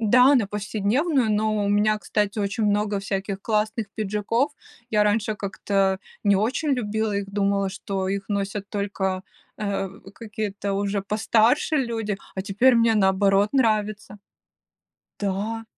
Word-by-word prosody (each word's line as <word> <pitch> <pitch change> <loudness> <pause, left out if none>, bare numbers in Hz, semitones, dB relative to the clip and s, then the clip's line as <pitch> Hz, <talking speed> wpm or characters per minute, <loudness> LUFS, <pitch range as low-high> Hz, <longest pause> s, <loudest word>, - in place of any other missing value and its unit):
Да, 250 +5 +6
на 235 -6 +3
повседневную. 220 - 0
Но 215 0 +1
у - - 0
меня, 210 +1 +2
кстати, 210 0 -1
очень 200 +2 -1
много 205 0 +1
всяких 195 0 -3
классных 215 +1 0
пиджаков. 215 +6 0 0.4
Я 210 -1 +3
раньше 215 +1 +1
как-то, 200 0 -5 0.2
а, 190 - -9 0.3
не 200 -1 +4
очень 250 +9 0
любила 220 -2 -1
их, 200 - -1
думала, 200 -1 +1
что 190 -1 -3
их 195 0 -3
носят 200 -1 -2
только, 195 -2 -2 0.4
э, 200 -2 -2 0.3
какие-то 210 -3 -4
уже 200 0 -1
постарше 220 +8 +2
люди, 225 -6 -1 0.2
а 190 - -2
теперь 220 +6 +3
мне, 230 -1 +4
наоборот, 195 +1 +3
нравится. 215 -5 0 1.0
Да. 205 +3 -2
210 Hz, 135 wpm, -24 LUFS, 200-220 Hz, 1.0 s, Да